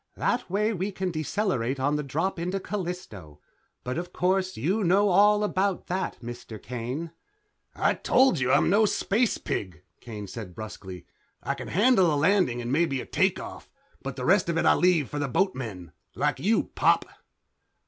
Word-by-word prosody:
"That 245 -4 -1
way 210 +4 +1
we 195 +1 -2
can 190 -1 -3
decelerate 155 - -1
on 145 +3 +1
the 150 - -1
drop 165 +7 -2
into 180 +3 -2
Callisto. 175 - -6 0.4
But, 125 +6 -3
of 175 0 -6
course, 185 +1 0
you 185 - 0
know 195 +3 +4
all 205 +3 +5
about 195 -2 0
that, 185 +2 -3
Mr. 120 -2 -8
Kane." 125 +9 -5 0.6
"I - - +2
told 260 - +3
you 130 0 +1
I'm - - +4
no 205 +5 +4
space 220 +4 +1
pig," 90 -3 -4 0.2
Kane 110 -4 -7
said 95 -2 -8
brusquely. 95 -4 -8 0.4
"I - - -1
can - - -8
handle 195 -3 +4
a - - +1
landing 150 -7 +2
and 120 - -3
maybe 145 -2 +1
a - - -6
takeoff, 190 0 -1 0.3
but 135 -1 -5
the 125 -1 -4
rest 185 +1 +3
of 165 - 0
it - - +1
I - - +6
leave 175 -6 +3
for 145 - -5
the 145 - -1
boatmen. 120 - -2 0.2
Like - - 0
you, 220 +4 +1
Pop." - - +3
170 Hz, 175 wpm, -26 LUFS, 125-195 Hz, 0.6 s, I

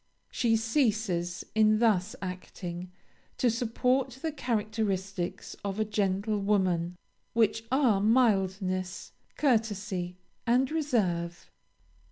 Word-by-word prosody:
She 235 -3 +2
ceases, 215 - 0
in 215 0 +4
thus 215 -1 +2
acting, 180 -1 -6 0.5
to 245 -3 +3
support 250 +3 0
the 320 - 0
characteristics 210 - -2
of 200 +1 -3
a 215 - +2
gentlewoman, 195 -3 +1 0.4
which 225 0 +2
are 255 -7 +3
mildness, 195 -5 +1 0.3
courtesy, 205 -8 0 0.3
and 255 +3 +3
reserve. 195 - -1
210 Hz, 90 wpm, -29 LUFS, 185-230 Hz, 0.5 s, in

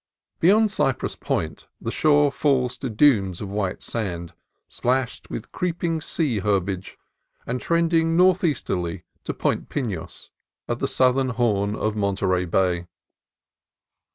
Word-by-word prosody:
Beyond 210 +5 +5
Cypress 135 -9 0
Point - - -3
the - - -3
shore 145 -2 +4
falls 135 -4 +1
to 130 - -3
dunes 105 -7 +3
of 100 -2 -6
white 100 -2 -2
sand, 85 -7 -3 0.3
splashed 130 0 -1
with - - -6
creeping 170 -2 -1
sea 145 -9 0
herbage, 95 -2 -1 0.5
and 125 +1 -3
trending 165 -1 +2
northeasterly 155 - +2 0.2
to - - -2
Point - - -1
Pinos, 110 - -3 0.4
at - - -2
the - - 0
south 130 0 +3
ern 135 -1 +1
horn 105 -4 +1
of 110 -1 -1
Monterey 95 -3 +1
Bay. 90 -1 +1
120 Hz, 125 wpm, -24 LUFS, 100-150 Hz, 0.5 s, Beyond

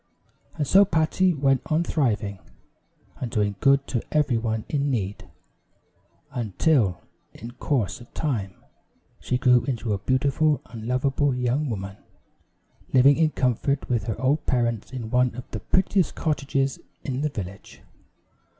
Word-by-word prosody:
And 150 - -1
so 195 +8 +6
Patty 180 +1 +2
went 135 -4 +2
on 155 +2 +1
thriving, 110 - -1 0.8
and 125 - -4
doing 105 -2 0
good 140 0 +4
to 120 - -2
every 150 -5 +2
one 110 -1 -2
in 145 -1 0
need, 105 -6 -3 1.0
until 110 - +1 0.3
in 115 +2 -8
course 120 - -2
of 120 - -15
time, 105 - -2 0.6
she 125 - -1
grew 125 -1 +4
into 120 -5 -2
a 100 - -2
beautiful 140 +7 +1
and 115 -1 -9
lovable 135 +2 +1
young 125 +4 0
woman, 100 -2 -5 0.9
living 135 +2 +6
in 160 -1 +3
comfort 135 +1 0
with 115 -4 0
her 110 - -3
old 140 +4 +1
parents 120 -3 0
in 120 -4 -6
one 125 -1 +2
of 125 - -6
the 110 - -4
prettiest 185 - +1
cottages 140 -3 -1 0.2
in 135 0 -3
the 150 - 0
village. 100 -6 -8
125 Hz, 140 wpm, -25 LUFS, 110-145 Hz, 1.0 s, so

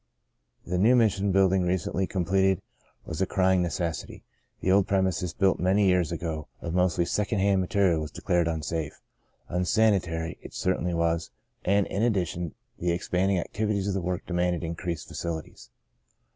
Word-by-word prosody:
The 90 0 -1
new 115 +6 +5
Mission 100 -4 +2
building 95 0 +4
recently 90 +1 0
com 90 -3 -2
pleted 95 0 +3 0.5
was 80 +3 -5
a 95 - +2
crying 95 -1 +2
necessity. 85 -1 -3 0.4
The 95 - +1
old 95 0 +4
premises 95 -3 0
built 95 +3 +2
many 95 +3 +3
years 90 -4 +2
ago 80 -2 -4
of 85 - -5
mostly 90 -1 +2
sec 105 +3 -1
ond 105 - +1
hand 100 -1 +3
material 95 -4 +2
was 75 - -4
declared 85 +1 0
unsafe. 80 -1 -3 0.5
Un 90 +1 -1
sanitary 90 -5 +1
it - - -11
certainly 90 -1 0
was 85 0 0 0.3
and, 100 +1 +3
in 100 - -3
addition, 90 -7 -1 0.2
the 90 - -1
expanding 90 +2 0
activities 100 +2 -1
of 100 - 0
the 95 - -1
work 90 +1 -3
demanded 90 0 0
increased 85 0 -4
facilities. 80 -7 -6
90 Hz, 160 wpm, -27 LUFS, 85-95 Hz, 0.5 s, new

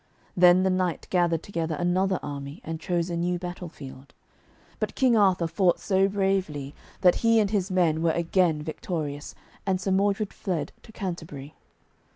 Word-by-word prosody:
Then 180 +1 +6
the 190 - +2
knight 185 -2 -1
gathered 170 -3 +2
together 165 -5 -3
another 185 +3 +1
army, 140 0 -6
and 160 0 -5
chose 175 +1 -1
a - - -2
new 175 +1 0
battle 180 0 -6
field. 135 -3 -12 0.6
But - - -3
King 255 -4 +3
Arthur 190 -5 +3
fought 175 +1 +2
so 195 -1 +2
bravely 190 -8 -1 0.3
that 180 -2 +5
he 230 -1 +4
and 205 -2 +1
his 200 -3 0
men 170 -4 +2
were 165 - +2
again 170 -1 +1
victorious, 150 -2 -5 0.3
and 190 -2 0
Sir 190 +1 -2
Modred 200 +2 +1
fled 165 -6 -3
to 220 - -15
Canterbury. 160 -8 -6
175 Hz, 165 wpm, -26 LUFS, 160-190 Hz, 0.6 s, Then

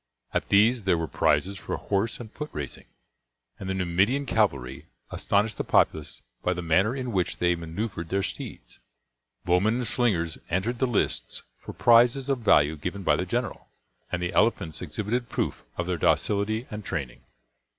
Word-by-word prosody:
At - - -1
these 110 +2 +4
there 90 -3 +3
were 80 0 -2
prizes 95 +6 +1
for 90 - -4
horse 100 +3 -1
and 110 -3 -9
foot 150 0 -5
racing, 70 -3 -6 0.7
and 95 - -5
the 95 - -1
Numidian 95 +10 +1
cavalry 70 - 0 0.2
astonished 105 +1 0
the - - +1
populace 80 -1 +1 0.2
by 90 - +1
the 90 0 -5
manner 95 +9 +2
in 130 -2 -3
which 95 -3 0
they 90 0 +2
maneuvered 85 +1 -4
their 100 0 0
steeds; - - -6 0.7
bowmen 90 +6 +3
and 125 0 -1
slingers 95 -9 +1
entered 105 +8 -1
the 130 - +2
lists 120 - -1 0.2
for - - -9
prizes 120 +3 +4
of 135 -2 +1
value 80 -8 +4
given 90 +6 -5
by - - +4
the - - -2
general; - - -3 0.4
and 90 -1 -2
the 85 - -2
elephants 105 -7 +1
exhibited 105 +8 -2
proof - - -2
of 90 - -1
their 90 -1 -1
docility 105 +7 +1
and 105 0 -5
training. 70 -9 -4
100 Hz, 170 wpm, -26 LUFS, 85-115 Hz, 0.7 s, these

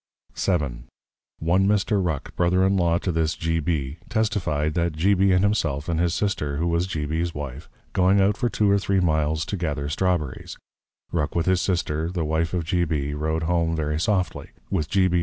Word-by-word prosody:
VII. 70 -10 -1 0.5
One 90 +4 +2
Mr. 105 -1 +2
Ruck, 80 -6 -3
Brother 90 +2 +3
in 95 +1 +2
Law 85 -2 +2
to 90 - -2
this 80 -1 0
G. 80 0 -1
B. 75 -2 -2
testified, 95 -10 0
that 85 -1 0
G. 90 +7 +2
B. 95 0 +3
and 90 +1 +3
himself, 80 -9 0
and 85 -2 0
his 85 0 +1
Sister, 75 -9 -1
who 80 - 0
was 85 +1 +1
G. 80 -6 -3
B's 80 +3 -2
Wife, 75 -1 -6 0.2
going 95 +2 +4
out 100 +1 +3
for 120 - 0
two 105 -3 +2
or 100 - +4
three 100 0 +1
Miles 80 -1 +1
to 100 - -3
gather 75 -5 -2
Straw 90 +4 +2
berries, 70 -5 -8 0.5
Ruck 75 -3 -1
with 85 -1 +1
his 95 -1 +2
Sister, 80 -3 -1
the 90 -3 -2
Wife 80 +2 0
of 85 - -1
G. 85 +2 +1
B. 75 -3 -1
Rode 80 +2 -1
home 85 0 +1
very 75 -1 -1
Softly, 95 0 -1 0.2
with 80 -6 -1
_G. 95 -1 +3
B. 90 -1 +1
85 Hz, 205 wpm, -24 LUFS, 75-95 Hz, 0.5 s, going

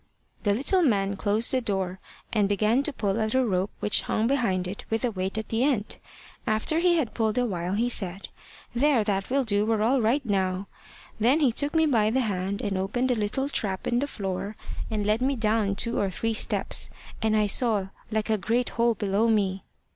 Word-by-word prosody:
The 205 -2 +1
little 285 - +2
man 200 - +2
closed 210 +3 +1
the 260 - +2
door, 190 -4 -2 0.3
and 205 -3 +2
began 215 +5 +2
to 300 - -1
pull 215 -4 -1
at 220 +2 0
a 260 -1 +3
rope 190 -2 0
which 210 - +3
hung 220 - -1
behind 230 -9 +1
it 195 +3 -6
with 225 +2 0
a 240 - 0
weight 190 +1 -3
at 220 - -4
the 225 +2 +1
end. 255 -7 0 0.5
After 220 +9 +1
he 350 0 +3
had 265 -9 -1
pulled 220 -1 0
a 250 - +2
while, 180 -4 -2
he 230 +4 +1
said 195 -5 -3 0.5
`There, 255 -3 +3
that 195 -2 -1
will 275 +1 +2
do; 205 -3 +2
we're 220 -1 +1
all 250 +3 +3
right 255 +6 +1
now.' 190 -2 0 0.5
Then 250 +8 +4
he 280 -6 +3
took 285 +6 -1
me 320 0 +4
by 225 -8 +3
the 260 +4 +1
hand 200 -2 -2
and 195 -2 -1
opened 245 +7 0
a - - +2
little 220 +5 -1
trap 195 -9 -2
in 240 - +1
the 285 - -1
floor, 200 -3 -4 0.3
and 210 -2 -2
led 215 +3 +1
me 270 +2 +1
down 215 -3 +1
two 235 +3 0
or 200 - +1
three 225 +5 -2
steps, - - 0 0.3
and 220 -1 +2
I 215 -1 +3
saw 205 -2 +3 0.2
like 220 0 -1
a 215 - +1
great 235 +6 0
hole 235 0 +1
below 205 +2 +1
me. 195 -4 +1
220 Hz, 215 wpm, -26 LUFS, 200-245 Hz, 0.5 s, Then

